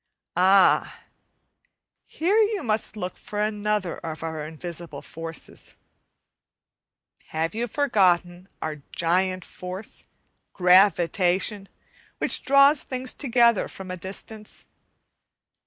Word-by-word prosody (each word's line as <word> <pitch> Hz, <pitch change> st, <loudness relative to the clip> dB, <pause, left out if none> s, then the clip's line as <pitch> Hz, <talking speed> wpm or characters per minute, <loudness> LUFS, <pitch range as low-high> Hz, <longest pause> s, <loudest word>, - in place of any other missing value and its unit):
Ah! 190 Hz, +2 st, +4 dB, 1.0 s
here 365 Hz, +7 st, +1 dB
you 425 Hz, -2 st, +1 dB
must 215 Hz, -1 st, -1 dB
look 180 Hz, -2 st, -5 dB
for 205 Hz, -, -6 dB
another 210 Hz, -3 st, -1 dB
of 160 Hz, 0 st, -6 dB
our 160 Hz, -2 st, -4 dB
invisible 165 Hz, -2 st, -8 dB
forces. 165 Hz, -1 st, -6 dB, 1.5 s
Have 160 Hz, +3 st, -2 dB
you 235 Hz, +2 st, -2 dB
forgotten 185 Hz, -8 st, +1 dB
our 155 Hz, -1 st, -3 dB, 0.2 s
giant 185 Hz, +1 st, +1 dB
force, 185 Hz, +3 st, -7 dB, 0.5 s
"gravitation," 185 Hz, +1 st, +3 dB, 0.5 s
which -, -, 0 dB
draws 275 Hz, +1 st, +5 dB
things 255 Hz, 0 st, -2 dB
together 235 Hz, -5 st, +3 dB
from 190 Hz, -1 st, -9 dB
a -, -, -3 dB
distance? 210 Hz, +4 st, -6 dB
190 Hz, 95 wpm, -25 LUFS, 175-220 Hz, 1.5 s, draws